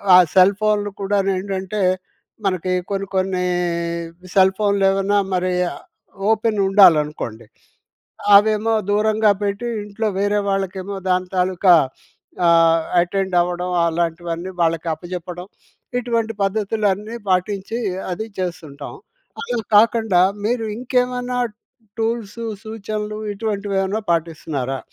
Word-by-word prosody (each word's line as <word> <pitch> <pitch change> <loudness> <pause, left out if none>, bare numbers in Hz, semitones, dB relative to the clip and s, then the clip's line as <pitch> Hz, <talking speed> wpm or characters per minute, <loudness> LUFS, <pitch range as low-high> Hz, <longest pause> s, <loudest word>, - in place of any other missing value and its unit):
ఆ - - +10 0.2
సెల్ 190 +1 +6
ఫోన్‌లు 210 -1 +1
కూడాను 195 0 +1
ఏంటంటే 195 +1 -3 0.6
మనకి 185 -1 0 0.2
కొన్ని 195 0 -2
కొన్ని 185 -1 0 0.9
సెల్ 190 -1 +5
ఫోన్‌లు 200 -2 +2
ఏవన్నా 195 +1 +1 0.2
మరి 180 0 0 0.8
ఓపెన్ 220 0 +1
ఉండాలనుకోండి 150 - +3 0.9
అవేమో 215 +2 +3 0.2
దూరంగా 215 +1 +3
పెట్టి 205 +4 -2 0.2
ఇంట్లో 210 +2 -4
వేరే 205 +1 +1
వాళ్ళకేమో 195 0 -3
దాని 185 0 +1
తాలూకా 180 0 +4 0.7
ఆహ్, 165 -1 +5 0.2
అటెండ్ 190 +1 -1
అవ్వడం 180 +1 -2 0.2
అలాంటివన్నీ 170 +1 -2
వాళ్ళకి 165 0 +1
అప్పజెప్పడం 180 +1 -7 0.5
ఇటువంటి 230 -2 -1
పద్ధతులన్నీ 210 +1 -1
పాటించి 195 +4 -1 0.3
అది 220 +5 -4
చేస్తుంటాం. 170 - -5 0.5
అలా 245 - -2 0.2
కాకుండా 220 -3 +4 0.3
మీరు 235 0 0
ఇంకేమన్నా 250 0 -1 0.6
టూల్స్ 225 -1 -2 0.3
సూచనలు 215 -1 -5
ఇటువంటివి 205 -1 -3
ఏమన్నా 195 +3 -1
పాటిస్తున్నారా? 155 -5 -2
195 Hz, 100 wpm, -20 LUFS, 180-215 Hz, 0.9 s, ఆ